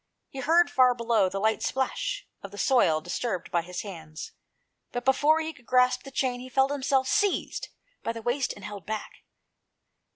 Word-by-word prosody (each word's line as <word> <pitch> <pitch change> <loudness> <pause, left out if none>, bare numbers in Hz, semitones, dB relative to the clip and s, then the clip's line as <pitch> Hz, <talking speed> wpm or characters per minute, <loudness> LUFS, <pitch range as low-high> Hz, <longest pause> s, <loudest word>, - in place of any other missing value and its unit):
He 270 - -8
heard, 335 +6 +4
far 255 -1 +5
below, 230 -5 +2
the 195 +1 -3
light 220 +2 +1
splash 270 - -2
of 200 - -8
the 205 - -11
soil 185 -12 +3
disturbed 185 +3 -3
by 170 - +2
his 180 +1 -6
hands; 160 -6 -8 0.6
but 245 +1 -4
before 295 +4 +4
he 320 0 -4
could 250 -5 -21
grasp 250 0 +4
the 275 - -10
chain, 260 -2 -1
he 255 +1 -9
felt 265 +2 +2
himself 270 -1 +1
seized 405 +6 0 0.3
by - - -2
the 230 -1 -7
waist 250 +4 0
and - - -10
held 205 -4 -8
back. 215 0 -5
245 Hz, 185 wpm, -27 LUFS, 205-265 Hz, 0.6 s, far